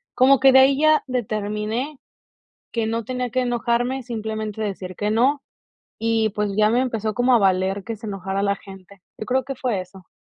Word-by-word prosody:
Como 265 Hz, +1 st, +5 dB
que 270 Hz, 0 st, +6 dB
de 265 Hz, -, +8 dB
ahí 270 Hz, +1 st, +5 dB
ya 310 Hz, 0 st, +4 dB
determiné 220 Hz, +3 st, -3 dB, 0.7 s
que 230 Hz, -2 st, -1 dB
no 230 Hz, +1 st, -2 dB
tenía 250 Hz, 0 st, -3 dB
que 255 Hz, +2 st, 0 dB
enojarme, 245 Hz, +1 st, 0 dB
simplemente 220 Hz, -2 st, -4 dB
decir 185 Hz, -3 st, -5 dB
que 210 Hz, 0 st, -1 dB
no, 270 Hz, +6 st, +2 dB, 0.6 s
y, 225 Hz, -1 st, +1 dB
pues, 210 Hz, 0 st, -2 dB
ya 215 Hz, 0 st, +4 dB
me 240 Hz, +2 st, +2 dB
empezó 225 Hz, -4 st, -1 dB
como 245 Hz, +3 st, +3 dB
a -, -, +6 dB
valer 190 Hz, 0 st, +1 dB
que 225 Hz, -1 st, -5 dB
se 220 Hz, -, -10 dB
enojara 195 Hz, -1 st, -3 dB
la 200 Hz, 0 st, +2 dB
gente. 195 Hz, 0 st, -14 dB, 0.2 s
Yo 215 Hz, -, -6 dB
creo 260 Hz, +1 st, +1 dB
que 270 Hz, +1 st, -5 dB
fue 240 Hz, -7 st, -1 dB
eso. 185 Hz, 0 st, -12 dB
225 Hz, 195 wpm, -22 LUFS, 205-255 Hz, 0.7 s, de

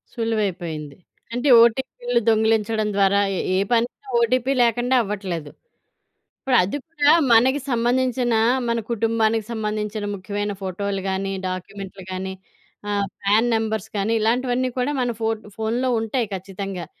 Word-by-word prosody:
సులువైపోయింది. 180 Hz, -, -2 dB, 0.4 s
అంటే 245 Hz, +4 st, 0 dB
ఓటీపీలు 240 Hz, 0 st, +1 dB
దొంగిలించడం 220 Hz, 0 st, +2 dB
ద్వారా 200 Hz, 0 st, +3 dB, 0.2 s
ఎ -, -, -1 dB, 0.2 s
ఏ -, -, +3 dB
పనైన 240 Hz, +3 st, 0 dB
ఓటీపీ 255 Hz, +3 st, +2 dB
లేకుండా 240 Hz, +2 st, +2 dB
అవ్వట్లేదు. 190 Hz, -7 st, -4 dB, 0.9 s
ఇప్పుడు 265 Hz, -2 st, +1 dB
అది 200 Hz, +10 st, -2 dB
కూడా 295 Hz, -3 st, +3 dB, 0.2 s
మనకి 260 Hz, +5 st, +4 dB
సంబంధించిన 245 Hz, 0 st, +1 dB, 0.3 s
మన 235 Hz, 0 st, +1 dB
కుటుంబానికి 225 Hz, -1 st, +1 dB
సంబంధించిన 215 Hz, -1 st, -3 dB
ముఖ్యమైన 205 Hz, +2 st, -3 dB
ఫోటోలు 195 Hz, +1 st, -3 dB
గానీ, 195 Hz, +1 st, -2 dB, 0.2 s
డాక్యుమెంట్‌లు 190 Hz, +1 st, -7 dB
గానీ, 190 Hz, +1 st, -4 dB, 0.6 s
ఆహ్, 200 Hz, -1 st, 0 dB, 0.2 s
ఫ్యాన్ 215 Hz, +4 st, +3 dB
నంబర్స్ 220 Hz, -1 st, -2 dB
కానీ 205 Hz, +3 st, 0 dB
ఇలాంటివన్నీ 245 Hz, +3 st, +1 dB
కూడా 250 Hz, +3 st, 0 dB
మన 245 Hz, -, 0 dB
ఫో 220 Hz, -, +1 dB, 0.3 s
ఫోన్‌లో 235 Hz, +4 st, 0 dB
ఉంటాయి 225 Hz, +1 st, -1 dB
ఖచ్చితంగా. 190 Hz, -1 st, -6 dB
220 Hz, 125 wpm, -22 LUFS, 200-240 Hz, 0.9 s, మనకి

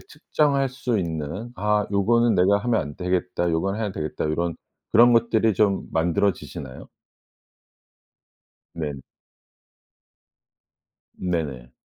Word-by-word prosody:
측정할 145 Hz, -2 st, 0 dB
수 125 Hz, -4 st, -2 dB
있는 85 Hz, +7 st, -4 dB
'아 105 Hz, 0 st, +1 dB
요거는 115 Hz, +4 st, +3 dB
내가 100 Hz, +3 st, +4 dB
하면 120 Hz, -2 st, +2 dB
안 75 Hz, 0 st, -7 dB
되겠다. 90 Hz, -1 st, -1 dB
요건 95 Hz, +5 st, 0 dB
해야 105 Hz, -3 st, -2 dB
되겠다.' 75 Hz, -3 st, -4 dB
요런 85 Hz, +2 st, -1 dB, 0.3 s
그런 120 Hz, +2 st, +6 dB
것들이 115 Hz, -2 st, +3 dB
좀 100 Hz, 0 st, +1 dB
만들어지시나요? 80 Hz, -5 st, -2 dB, 1.9 s
네. 75 Hz, -3 st, -3 dB, 2.3 s
네네. 75 Hz, -9 st, -3 dB
95 Hz, 215 characters per minute, -24 LUFS, 80-115 Hz, 2.3 s, 그런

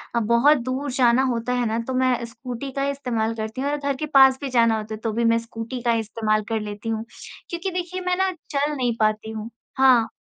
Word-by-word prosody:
अ, -, -, +3 dB
बहुत 235 Hz, +7 st, +4 dB
दूर 270 Hz, +2 st, -2 dB
जाना 250 Hz, 0 st, +3 dB
होता 235 Hz, +1 st, -2 dB
है 245 Hz, -1 st, 0 dB
ना, 225 Hz, +1 st, -1 dB
तो 260 Hz, -, -2 dB
मैं 255 Hz, 0 st, +2 dB
स्कूटी 245 Hz, +3 st, -7 dB
का 275 Hz, -, -3 dB
ही 280 Hz, -, +1 dB
इस्तेमाल 235 Hz, -5 st, -2 dB
करती 220 Hz, +3 st, -4 dB
हूँ 280 Hz, -, 0 dB
और 295 Hz, -, 0 dB
घर 280 Hz, -1 st, -2 dB
के 305 Hz, -, -3 dB
पास 265 Hz, -1 st, +7 dB
भी 275 Hz, -, -3 dB
जाना 230 Hz, -2 st, +3 dB
होता 215 Hz, 0 st, -6 dB
है, -, -, -11 dB
तो 225 Hz, -, -1 dB
भी 235 Hz, +1 st, 0 dB
मैं 230 Hz, -, +3 dB
स्कूटी 230 Hz, +2 st, -6 dB
का 235 Hz, -1 st, +2 dB
इस्तेमाल 215 Hz, -1 st, 0 dB
कर 225 Hz, -1 st, 0 dB
लेती 210 Hz, +1 st, -6 dB
हूँ। 225 Hz, 0 st, -2 dB, 0.5 s
क्योंकि 350 Hz, +2 st, -3 dB
देखिए, 360 Hz, +1 st, -4 dB
मैं 360 Hz, 0 st, 0 dB
ना 380 Hz, 0 st, +2 dB, 0.2 s
चल 290 Hz, +1 st, 0 dB
नहीं 245 Hz, -4 st, 0 dB
पाती 215 Hz, +1 st, +1 dB
हूँ। 220 Hz, +1 st, -6 dB, 0.3 s
हाँ। 255 Hz, -4 st, +5 dB
245 Hz, 240 wpm, -23 LUFS, 225-275 Hz, 0.5 s, पास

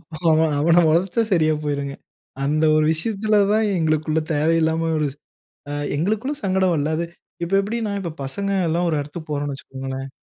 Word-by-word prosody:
இப்போ 160 Hz, -1 st, -12 dB, 0.2 s
அவன, 160 Hz, 0 st, +4 dB
அவன 170 Hz, +3 st, +5 dB
வளச்சா 180 Hz, +7 st, +2 dB
சரியா 155 Hz, -3 st, +3 dB
போயிருங்க. 140 Hz, -1 st, -2 dB, 0.5 s
அந்த 155 Hz, +3 st, +1 dB
ஒரு 155 Hz, -, +3 dB
விஷயத்துல 210 Hz, +5 st, 0 dB
தான் 220 Hz, 0 st, +3 dB
எங்களுக்குள்ள 155 Hz, 0 st, +1 dB
தேவையில்லாம 160 Hz, +1 st, +2 dB
ஒரு 150 Hz, -, +1 dB, 0.6 s
அ -, -, -3 dB, 0.2 s
எங்களுக்குள்ள 215 Hz, -, 0 dB
சங்கடம் 190 Hz, -2 st, +2 dB
வல்ல. 155 Hz, 0 st, 0 dB
அது 170 Hz, -, -1 dB, 0.4 s
இப்ப 175 Hz, +3 st, -3 dB
எப்பிடின்னா 215 Hz, 0 st, -2 dB
இப்போ 170 Hz, -, -4 dB
பசங்கலாம் 175 Hz, +2 st, 0 dB
ஒரு 155 Hz, -, +1 dB
எடத்துக்கு 155 Hz, +2 st, -8 dB
போறோன்னு 145 Hz, -1 st, -2 dB
வச்சுக்கோங்களேன்! 135 Hz, 0 st, -6 dB
160 Hz, 155 wpm, -22 LUFS, 150-190 Hz, 0.6 s, அவன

